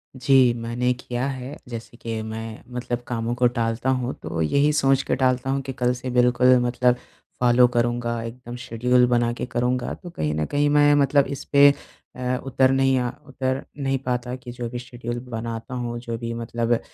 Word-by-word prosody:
जी, 130 Hz, -1 st, +4 dB
मैंने 120 Hz, +2 st, -1 dB
किया 125 Hz, +1 st, -4 dB
है। 130 Hz, +1 st, -6 dB
जैसे 115 Hz, 0 st, -8 dB
कि 115 Hz, -2 st, -4 dB
मैं 110 Hz, 0 st, -6 dB
मतलब 120 Hz, -1 st, -3 dB
कामों 115 Hz, 0 st, -2 dB
को 125 Hz, 0 st, +4 dB
टालता 120 Hz, +1 st, -1 dB
हूँ, 130 Hz, -1 st, 0 dB
तो 80 Hz, -, -3 dB
यही 140 Hz, -, +3 dB
सोच 135 Hz, -2 st, +3 dB
के -, -, 0 dB
टालता 130 Hz, -1 st, +1 dB
हूँ 135 Hz, 0 st, 0 dB
कि 135 Hz, 0 st, -6 dB
कल 125 Hz, -1 st, +1 dB
से 125 Hz, +1 st, -5 dB
बिल्कुल 125 Hz, +1 st, +5 dB
मतलब 125 Hz, 0 st, +2 dB, 0.4 s
फॉलो 125 Hz, 0 st, +5 dB
करूँगा, 120 Hz, 0 st, 0 dB
एकदम 120 Hz, +1 st, -8 dB
शेड्यूल 125 Hz, +1 st, +2 dB
बना 120 Hz, -1 st, +2 dB
के -, -, -4 dB
करूँगा। 125 Hz, 0 st, -1 dB
तो 175 Hz, -, -10 dB
कहीं 75 Hz, -, -2 dB
न 75 Hz, 0 st, 0 dB
कहीं 145 Hz, -, +1 dB
मैं 145 Hz, 0 st, +5 dB
मतलब 140 Hz, 0 st, +3 dB
इस -, -, -8 dB
पे 140 Hz, 0 st, +8 dB, 0.5 s
अ, 125 Hz, 0 st, -1 dB
उतर 135 Hz, 0 st, +3 dB
नहीं 135 Hz, 0 st, +3 dB
अ, 125 Hz, -1 st, -1 dB, 0.2 s
उतर 130 Hz, 0 st, -2 dB
नहीं 135 Hz, -1 st, 0 dB
पाता 125 Hz, 0 st, -2 dB
कि 125 Hz, -1 st, -9 dB
जो 120 Hz, -1 st, -5 dB
भी 120 Hz, +1 st, -5 dB
शेड्यूल 120 Hz, -1 st, -6 dB
बनाता 115 Hz, +1 st, -5 dB
हूँ, 120 Hz, -1 st, -3 dB
जो 115 Hz, -1 st, -5 dB
भी 115 Hz, 0 st, -4 dB
मतलब 115 Hz, 0 st, -1 dB
अ, 115 Hz, -, +2 dB
125 Hz, 195 wpm, -23 LUFS, 120-130 Hz, 0.5 s, पे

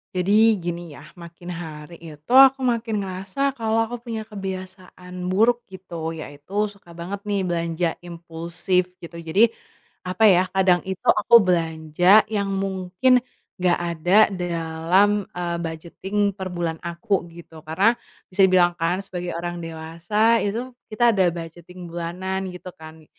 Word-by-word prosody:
Jadi 210 Hz, +4 st, +4 dB
gini 175 Hz, -1 st, -5 dB
ya, 145 Hz, -, -12 dB
makin 170 Hz, 0 st, -12 dB
hari 160 Hz, -1 st, -8 dB
itu 155 Hz, +6 st, -7 dB
aku 270 Hz, 0 st, +8 dB
makin 230 Hz, -3 st, -1 dB
ngerasa 195 Hz, +8 st, -2 dB
kalo 225 Hz, -1 st, 0 dB
aku 240 Hz, -, -5 dB, 0.2 s
punya 220 Hz, -1 st, -4 dB
kebiasaan 185 Hz, -2 st, -8 dB
buruk 235 Hz, +5 st, +3 dB
gitu 170 Hz, -3 st, -6 dB
yaitu 160 Hz, +6 st, -4 dB
suka 200 Hz, -4 st, -16 dB
banget 175 Hz, +4 st, -7 dB
nih 205 Hz, -2 st, -1 dB
belanja 170 Hz, 0 st, -1 dB
impulsif 170 Hz, +2 st, -2 dB
gitu. 170 Hz, 0 st, -11 dB
Jadi, 190 Hz, +8 st, +4 dB, 0.6 s
apa 185 Hz, +4 st, -1 dB
ya, 185 Hz, -2 st, +5 dB
kadang 185 Hz, -2 st, +3 dB
itu 190 Hz, -1 st, -6 dB
aku 235 Hz, +3 st, +6 dB
belanja 175 Hz, +1 st, +3 dB
yang 200 Hz, -2 st, -2 dB
mungkin 195 Hz, +6 st, +1 dB, 0.4 s
nggak 180 Hz, -1 st, +2 dB
ada 175 Hz, +2 st, +1 dB, 0.2 s
dalam, 175 Hz, +4 st, +1 dB
eee, 170 Hz, -1 st, -2 dB
budgeting 170 Hz, +5 st, -6 dB, 0.2 s
per 190 Hz, -1 st, -6 dB
bulan 170 Hz, -2 st, -2 dB
aku, 170 Hz, +1 st, -2 dB
gitu. 165 Hz, -1 st, -13 dB
Karena, 185 Hz, +9 st, +2 dB, 0.3 s
bisa 190 Hz, +1 st, -1 dB
dibilang 175 Hz, -1 st, +4 dB
kan 175 Hz, +2 st, 0 dB
sebagai 180 Hz, -2 st, -5 dB
orang 175 Hz, 0 st, -4 dB
dewasa 170 Hz, +8 st, 0 dB
itu 235 Hz, +5 st, -3 dB, 0.2 s
kita 235 Hz, +2 st, +3 dB
ada 185 Hz, -3 st, +4 dB
budgeting 175 Hz, +2 st, -9 dB
bulanan 185 Hz, +3 st, -4 dB
gitu 180 Hz, 0 st, -11 dB
kan. 160 Hz, 0 st, -13 dB
180 Hz, 140 wpm, -23 LUFS, 170-200 Hz, 0.6 s, aku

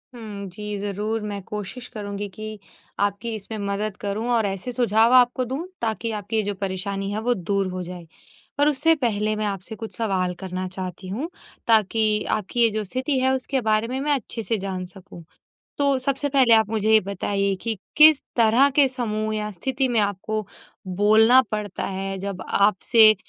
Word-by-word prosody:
हुँ, 210 Hz, -4 st, -7 dB
जी। 210 Hz, +3 st, -6 dB
ज़रूर 205 Hz, +2 st, -2 dB
मैं 205 Hz, -1 st, -4 dB
कोशिश 210 Hz, +5 st, -6 dB
करूँगी 205 Hz, -2 st, -5 dB
कि 215 Hz, +2 st, -8 dB, 0.4 s
आपकी 205 Hz, +3 st, -1 dB
इसमें 215 Hz, +1 st, -7 dB
मदद 205 Hz, +1 st, -2 dB
करूँ 205 Hz, +3 st, -3 dB
और 225 Hz, -3 st, +2 dB
ऐसे 195 Hz, +5 st, -2 dB
सुझाव 235 Hz, -1 st, +3 dB
आपको 250 Hz, 0 st, +5 dB
दूँ 265 Hz, +4 st, -3 dB, 0.2 s
ताकि 225 Hz, 0 st, -1 dB
आपकी 210 Hz, +1 st, -4 dB
ये -, -, +3 dB
जो 205 Hz, 0 st, -2 dB
परेशानी 195 Hz, +1 st, -3 dB
है 210 Hz, -, -2 dB
वो 245 Hz, -, +4 dB
दूर 195 Hz, -1 st, -1 dB
हो 185 Hz, 0 st, -4 dB
जाए। 175 Hz, -1 st, -9 dB, 0.5 s
पर 290 Hz, +1 st, +4 dB
उससे 300 Hz, +3 st, +3 dB
पहले 215 Hz, -5 st, 0 dB
मैं 215 Hz, 0 st, -2 dB
आपसे 195 Hz, +1 st, -4 dB
कुछ 225 Hz, 0 st, -8 dB
सवाल 190 Hz, -5 st, 0 dB
करना 185 Hz, 0 st, -4 dB
चाहती 185 Hz, 0 st, -7 dB
हूँ 270 Hz, -, -3 dB, 0.4 s
ताकि 215 Hz, -1 st, +3 dB
आपकी 215 Hz, +3 st, 0 dB
ये 230 Hz, -, +5 dB
जो 215 Hz, 0 st, -2 dB
स्थिति 260 Hz, +7 st, -2 dB
है 260 Hz, +1 st, +3 dB
उसके 265 Hz, 0 st, -2 dB
बारे 215 Hz, 0 st, +1 dB
में, 260 Hz, +2 st, -3 dB
मैं 295 Hz, +2 st, 0 dB
अच्छे 230 Hz, -2 st, -5 dB
से 225 Hz, -, 0 dB
जान 190 Hz, -2 st, -4 dB
सकूँ। 180 Hz, -1 st, -12 dB, 0.6 s
तो 280 Hz, -1 st, +3 dB
सबसे 275 Hz, +2 st, -1 dB
पहले 265 Hz, -4 st, +5 dB
आप 220 Hz, -1 st, +4 dB
मुझे 220 Hz, 0 st, 0 dB
ये 220 Hz, -, +7 dB
बताइए 200 Hz, 0 st, -1 dB
कि, 220 Hz, +2 st, -4 dB, 0.2 s
किस 310 Hz, -2 st, +8 dB
तरह 235 Hz, +4 st, +5 dB
के 285 Hz, -1 st, +6 dB
समूह 220 Hz, -4 st, -2 dB
या 210 Hz, 0 st, -3 dB
स्थिति 260 Hz, +8 st, -1 dB
में 235 Hz, -3 st, +2 dB
आपको 205 Hz, +1 st, -2 dB, 0.5 s
बोलना 220 Hz, +5 st, +6 dB
पड़ता 210 Hz, -2 st, -3 dB
है 195 Hz, 0 st, -3 dB
जब 195 Hz, -1 st, -5 dB
आपसे 215 Hz, +2 st, +5 dB
215 Hz, 185 wpm, -23 LUFS, 200-235 Hz, 0.6 s, किस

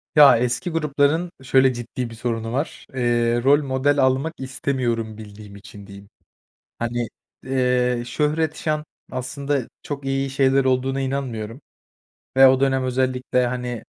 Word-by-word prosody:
Ya, 145 Hz, -6 st, +8 dB
eski 125 Hz, +9 st, -1 dB
grupların 155 Hz, +1 st, +1 dB
şöyle 130 Hz, 0 st, +4 dB
ciddi 120 Hz, 0 st, -5 dB
bir 115 Hz, -, -10 dB
sorunu 115 Hz, -1 st, -3 dB
var, 140 Hz, +5 st, -3 dB
eee, 120 Hz, -1 st, +1 dB
rol 145 Hz, +3 st, +5 dB
model 140 Hz, +1 st, +1 dB
almak 135 Hz, +5 st, +2 dB
istemiyorum 125 Hz, -4 st, -2 dB
bildiğim 105 Hz, -1 st, -11 dB
için, 100 Hz, 0 st, -12 dB
diyeyim. 100 Hz, 0 st, -13 dB, 0.7 s
Hani, 120 Hz, 0 st, -2 dB, 0.4 s
eee, 125 Hz, -2 st, +1 dB
şöhret, 155 Hz, +3 st, 0 dB
şan 155 Hz, -1 st, -2 dB, 0.3 s
aslında 135 Hz, +1 st, -3 dB
çok 140 Hz, -1 st, -6 dB
iyi 135 Hz, 0 st, -1 dB
şeyler 135 Hz, 0 st, +3 dB
olduğuna 130 Hz, +1 st, +1 dB
inanmıyorum 130 Hz, -3 st, -4 dB, 0.8 s
ve 135 Hz, 0 st, +9 dB
o 130 Hz, 0 st, +4 dB
dönem 135 Hz, -1 st, +2 dB
özellikle, 125 Hz, 0 st, 0 dB
hani, 125 Hz, -2 st, -4 dB
130 Hz, 135 wpm, -22 LUFS, 120-140 Hz, 0.8 s, ve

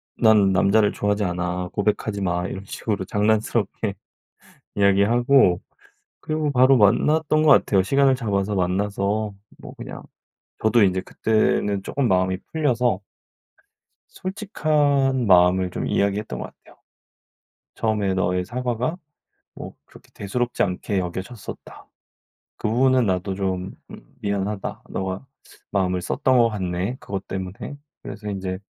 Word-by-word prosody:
"난 105 Hz, -4 st, +4 dB
남자를 100 Hz, +3 st, +3 dB
좋아하지 105 Hz, 0 st, 0 dB
않아. 90 Hz, 0 st, -2 dB
고백하지 105 Hz, 0 st, -1 dB
마." 90 Hz, -1 st, -1 dB
이런 95 Hz, -, -6 dB
식으로 100 Hz, 0 st, -3 dB
장난스럽게 105 Hz, 0 st, 0 dB, 0.8 s
이야기하고 100 Hz, +1 st, +4 dB, 0.6 s
그리고 155 Hz, -1 st, -1 dB
바로 130 Hz, 0 st, +5 dB
만났던 150 Hz, +9 st, +3 dB
것 155 Hz, -, +4 dB
같아요. 100 Hz, -7 st, +4 dB
시간을 135 Hz, +5 st, +3 dB
잡아서 105 Hz, -4 st, -1 dB
만나서 100 Hz, +3 st, -1 dB, 0.3 s
뭐 -, -, -10 dB
그냥 -, -, -8 dB, 0.6 s
저도 110 Hz, +1 st, +4 dB
인제 95 Hz, -1 st, +2 dB
그때는 105 Hz, -1 st, 0 dB
쪼금 140 Hz, +3 st, -1 dB
마음이 95 Hz, 0 st, +2 dB
풀려서 125 Hz, -, +1 dB, 1.1 s
솔직한 150 Hz, -, 0 dB
마음을 90 Hz, -1 st, +4 dB
좀 -, -, -4 dB
이야기했던 100 Hz, +1 st, -1 dB
것 -, -, -5 dB
같아요. -, -, -20 dB, 1.0 s
"처음에 105 Hz, -3 st, 0 dB
너의 90 Hz, -1 st, 0 dB
사과가 125 Hz, -, -2 dB, 0.6 s
뭐 -, -, -9 dB
그렇게 -, -, -19 dB
대수롭지 120 Hz, +5 st, -2 dB
않게 95 Hz, +2 st, -1 dB
여겨졌었다. 95 Hz, +4 st, -7 dB, 0.7 s
그 -, -, -2 dB
부분은 130 Hz, +2 st, +3 dB
나도 95 Hz, +1 st, -1 dB
좀 95 Hz, -1 st, -3 dB, 0.2 s
음 -, -, -14 dB
미안하다. 100 Hz, 0 st, -3 dB
너가 95 Hz, +5 st, -4 dB, 0.5 s
마음을 90 Hz, -2 st, 0 dB
썼던 130 Hz, +6 st, +1 dB
것 115 Hz, -1 st, +5 dB
같네. 95 Hz, +1 st, -3 dB
그것 100 Hz, -5 st, -6 dB
때문에." 95 Hz, +8 st, -6 dB, 0.2 s
그래서 105 Hz, +1 st, -7 dB
인제 95 Hz, -1 st, -4 dB
105 Hz, 290 characters per minute, -23 LUFS, 95-120 Hz, 1.1 s, 바로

